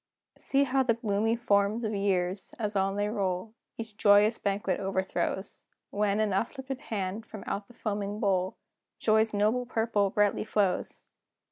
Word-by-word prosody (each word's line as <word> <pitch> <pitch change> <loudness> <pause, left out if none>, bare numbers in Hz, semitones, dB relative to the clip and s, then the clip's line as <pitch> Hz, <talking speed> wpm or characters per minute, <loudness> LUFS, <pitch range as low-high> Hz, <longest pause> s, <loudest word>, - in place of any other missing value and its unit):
See 275 0 +2
how 270 0 +2
the 240 -3 +2
gloomy 225 0 +1
forms 215 -1 +2
of 215 -1 -1
years, 190 -1 -1
as 210 -3 -3
on 195 0 +1
they 205 0 0
roll, 200 -1 -2 0.2
Each 225 -2 -7
joyous 210 +1 +5
banquet 200 -1 -1
overthrows, 190 0 -2 0.3
When, 205 0 +1
in 215 -2 +1
uplifted 265 +6 -2
hand, 205 -5 -3
from 210 - -8
out 200 0 -3
the 240 - -17
foaming 205 -2 -3
bowl, 190 -3 0 0.4
Joy's 220 0 +3
noble 215 +4 +1
purple 220 -4 +1
brightly 205 +1 +2
flows! 205 -3 -1
205 Hz, 150 wpm, -29 LUFS, 200-225 Hz, 0.4 s, joyous